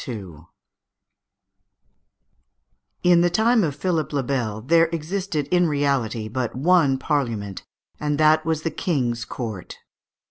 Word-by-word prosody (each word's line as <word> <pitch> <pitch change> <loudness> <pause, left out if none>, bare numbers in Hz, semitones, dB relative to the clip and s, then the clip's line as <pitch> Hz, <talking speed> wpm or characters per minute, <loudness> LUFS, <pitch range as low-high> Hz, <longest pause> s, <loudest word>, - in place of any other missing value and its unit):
] - - -6 3.0
In 175 -1 +5
the 175 - +3
time 225 +4 +3
of 145 -5 -1
Philippe 160 -2 -1
le 140 - 0
Bel 120 -5 -2
there 165 +7 +4
existed 165 -1 -3
in 180 -1 +3
reality 135 -7 -1
but 120 +1 -3
one 145 -1 +3
Parliament, 115 - -2 0.4
and 150 -1 -1
that 155 +1 +4
was 160 -1 -1
the 165 - -1
King's 120 -8 -1
Court. 110 -7 -6
150 Hz, 120 wpm, -23 LUFS, 125-170 Hz, 3.0 s, In